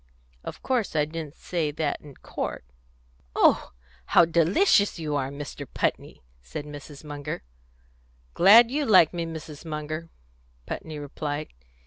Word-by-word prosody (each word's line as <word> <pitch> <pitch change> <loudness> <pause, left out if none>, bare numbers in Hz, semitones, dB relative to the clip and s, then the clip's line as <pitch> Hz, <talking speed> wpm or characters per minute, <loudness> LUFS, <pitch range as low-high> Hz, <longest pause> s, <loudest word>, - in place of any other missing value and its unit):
Of - - -8
course 240 -9 0
I 150 -1 +3
didn't 155 -1 -7
say 165 -4 -2
that 150 0 -2
in 145 -3 -13
court." - - -5 0.7
"Oh, - - +4 0.4
how 170 - +6
delicious 180 - +3
you 155 -3 -2
are, 135 -2 -1
Mr. 140 0 -7
Putney!" - - -2 0.2
said 60 - -7
Mrs. 145 -1 -10
Munger. 145 - -6 0.9
"Glad 230 +6 +8
you 295 +2 0
like 185 - +6
me, 170 -1 -2
Mrs. 155 -2 -8
Munger," 155 +1 -5 0.6
Putney 155 -1 -6
replied. 145 +1 -4
155 Hz, 130 wpm, -26 LUFS, 145-170 Hz, 0.9 s, Glad